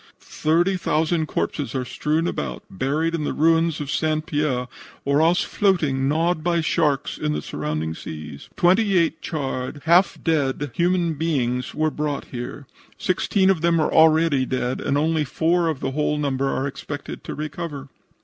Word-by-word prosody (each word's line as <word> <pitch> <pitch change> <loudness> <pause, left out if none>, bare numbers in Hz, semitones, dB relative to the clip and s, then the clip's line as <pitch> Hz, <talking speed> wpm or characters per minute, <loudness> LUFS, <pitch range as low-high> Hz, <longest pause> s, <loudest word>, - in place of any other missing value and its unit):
Thirty 175 +5 +1
thousand 160 -1 0
corpses 145 -2 -2
are 130 -1 -1
strewn 150 +6 -1
about, 65 - -4
buried 145 - -1
in 165 -2 -1
the - - -1
ruins 165 0 +2
of 145 -1 -4
St. 155 +2 0
Pierre, 145 -7 -1 0.4
or 140 +2 +3
else 175 +5 +3
floating, 155 -10 +1
gnawed 160 +2 +1
by 170 0 +2
sharks, 150 -3 0
in 75 - -1
the 75 - -2
surrounding 75 +1 -3
seas. 75 -3 -8
Twenty 190 +2 +4
eight 170 -2 +1
charred, 135 -2 -4
half 175 +4 +4
dead 145 -4 0
human 175 0 +1
beings 130 -6 -1
were 155 0 +1
brought 150 -2 -3
here. 125 +3 -6 0.3
Sixteen 190 +1 +2
of 175 -5 -1
them 170 0 +3
are 155 - +1
already 160 -3 +5
dead, 130 -1 -2
and 140 - 0
only 155 +1 +1
four 165 +5 +1
of 155 -4 -2
the 135 - -1
whole 150 +1 0
number 135 -2 0
are 135 - -1
expected 145 +1 -6
to - - -5
recover." 150 -2 -5
150 Hz, 165 wpm, -23 LUFS, 135-165 Hz, 0.4 s, already